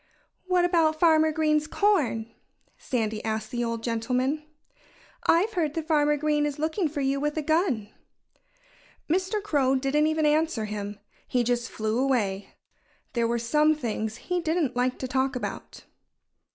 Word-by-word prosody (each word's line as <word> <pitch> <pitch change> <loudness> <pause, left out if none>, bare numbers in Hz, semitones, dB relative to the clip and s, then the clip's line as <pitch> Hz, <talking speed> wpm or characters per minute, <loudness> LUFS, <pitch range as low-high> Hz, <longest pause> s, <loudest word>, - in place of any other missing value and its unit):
"What 360 -1 +3
about 325 -3 +2
Farmer 315 -2 +5
Green's 305 -1 +1
corn?" 300 - +1 0.4
Sandy 220 -4 -2
asked 220 0 -3
the 240 -1 -1
old 230 -1 -3
gentleman. 250 +6 -1 0.8
"I've 390 +7 +3
heard 315 -6 -1
that 325 -2 -2
Farmer 295 -2 +2
Green 295 0 +1
is 290 - -4
looking 315 +3 0
for 290 -1 -4
you 275 +1 0
with 295 +2 -2
a 310 - -1
gun." 300 - +1 1.2
Mr. 375 +5 0
Crow 275 -9 +2
didn't 275 +3 +2
even 315 0 +1
answer 300 -6 +1
him. 205 -1 -5 0.3
He 250 -1 +1
just 240 0 -1
flew 220 +2 -2
away. 205 -8 0 0.6
There 235 -2 +1
were 235 +1 0
some 300 +7 +3
things 220 -5 -3
he 355 +9 -2
didn't 320 -5 0
like 250 +1 0
to 260 - -4
talk 265 +1 0
about. 250 - -6
285 Hz, 150 wpm, -26 LUFS, 235-315 Hz, 1.2 s, Farmer